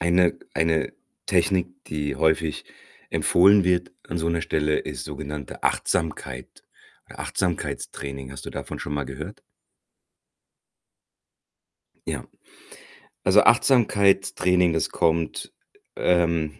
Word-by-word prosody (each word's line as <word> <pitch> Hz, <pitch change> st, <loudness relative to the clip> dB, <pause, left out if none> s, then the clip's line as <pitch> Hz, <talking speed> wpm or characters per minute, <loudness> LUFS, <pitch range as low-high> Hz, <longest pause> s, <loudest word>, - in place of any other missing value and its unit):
eine 85 Hz, 0 st, +3 dB, 0.2 s
eine 80 Hz, -1 st, +1 dB, 0.3 s
Technik, 95 Hz, -4 st, +2 dB, 0.2 s
die 75 Hz, -3 st, -3 dB
häufig 80 Hz, +1 st, +1 dB, 0.4 s
empfohlen 100 Hz, +3 st, +5 dB
wird 90 Hz, -1 st, +1 dB, 0.2 s
an 85 Hz, -, -2 dB
so 80 Hz, +1 st, -1 dB
'ner 85 Hz, 0 st, 0 dB
Stelle, 75 Hz, 0 st, +1 dB
ist -, -, -6 dB
sogenannte 70 Hz, -2 st, -7 dB
Achtsamkeit 65 Hz, -5 st, -2 dB, 0.4 s
Achtsamkeitstraining. 70 Hz, -6 st, -4 dB
Hast 70 Hz, -, -9 dB
du -, -, -6 dB
davon -, -, -6 dB
schon 75 Hz, -, -5 dB
mal 70 Hz, -1 st, -1 dB
gehört? 65 Hz, 0 st, -8 dB, 2.7 s
Ja. -, -, -3 dB, 1.0 s
Also, 100 Hz, +3 st, +6 dB
Achtsamkeitstraining, 100 Hz, -7 st, +3 dB
das 80 Hz, -, 0 dB
kommt, 80 Hz, -1 st, 0 dB, 0.4 s
ähm 85 Hz, -3 st, +1 dB
85 Hz, 100 wpm, -24 LUFS, 75-90 Hz, 2.7 s, Also